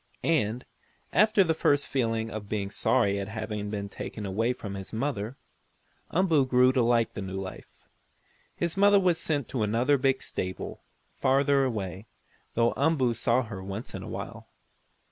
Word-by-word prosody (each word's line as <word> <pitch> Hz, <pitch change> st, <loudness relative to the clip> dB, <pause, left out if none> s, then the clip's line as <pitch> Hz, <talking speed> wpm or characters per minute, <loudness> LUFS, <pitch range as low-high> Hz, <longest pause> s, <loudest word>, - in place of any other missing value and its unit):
And, 125 Hz, -7 st, +1 dB, 0.5 s
after 215 Hz, 0 st, +5 dB
the 165 Hz, -3 st, +1 dB
first 145 Hz, -2 st, +2 dB
feeling 115 Hz, -4 st, -1 dB
of 105 Hz, -2 st, -6 dB
being 100 Hz, -2 st, -2 dB
sorry 100 Hz, -1 st, +2 dB
at 100 Hz, -, -4 dB
having 105 Hz, -1 st, -4 dB
been 100 Hz, -1 st, -3 dB
taken 105 Hz, +1 st, -6 dB
away 110 Hz, +5 st, 0 dB
from 105 Hz, -5 st, -6 dB
his 95 Hz, -1 st, -7 dB
mother, 115 Hz, 0 st, -3 dB, 0.7 s
Umboo 165 Hz, -7 st, +3 dB
grew 125 Hz, 0 st, +5 dB
to 130 Hz, -1 st, +2 dB
like 115 Hz, -1 st, +2 dB
the -, -, -5 dB
new 95 Hz, 0 st, -4 dB
life. 95 Hz, -1 st, -9 dB, 0.7 s
His 170 Hz, -1 st, -1 dB
mother 200 Hz, +1 st, +6 dB
was 180 Hz, -3 st, +2 dB
sent 145 Hz, -5 st, -1 dB
to 125 Hz, -, -2 dB
another 120 Hz, +7 st, +2 dB
big 135 Hz, 0 st, +1 dB
stable, 95 Hz, 0 st, -5 dB, 0.3 s
farther 140 Hz, +1 st, +3 dB
away, 100 Hz, -4 st, -4 dB, 0.5 s
though 115 Hz, 0 st, +3 dB
Umboo 140 Hz, -5 st, +2 dB
saw 120 Hz, +2 st, +2 dB
her 100 Hz, -5 st, -7 dB
once 100 Hz, +4 st, -6 dB
in -, -, -5 dB
a -, -, -8 dB
while. -, -, -7 dB
115 Hz, 165 wpm, -28 LUFS, 105-140 Hz, 0.7 s, mother